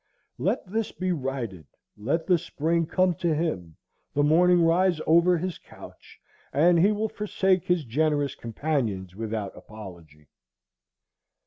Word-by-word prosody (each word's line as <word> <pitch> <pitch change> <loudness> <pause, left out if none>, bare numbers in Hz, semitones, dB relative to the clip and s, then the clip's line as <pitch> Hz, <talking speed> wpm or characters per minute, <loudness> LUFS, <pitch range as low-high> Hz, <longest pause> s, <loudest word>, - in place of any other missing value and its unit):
Let - - 0
this 220 +4 -2
be 185 0 -2
righted, 130 - -4 0.3
let 140 +10 -1
the 180 -3 +3
spring 165 0 -1
come 185 +1 +2
to 165 0 -1
him, 95 - -3 0.4
the 145 - +3
morning 175 +3 +4
rise 170 +1 +3
over 170 +2 +4
his 180 +1 -4
couch, - - -15 0.3
and 170 +5 +4
he 195 +5 +5
will 215 +1 -1
forsake 195 -3 0
his 175 -4 +1
generous 145 +2 0
companions 115 - -3
without 110 -2 -4
apology. 85 -8 -12
160 Hz, 130 wpm, -26 LUFS, 115-180 Hz, 0.4 s, he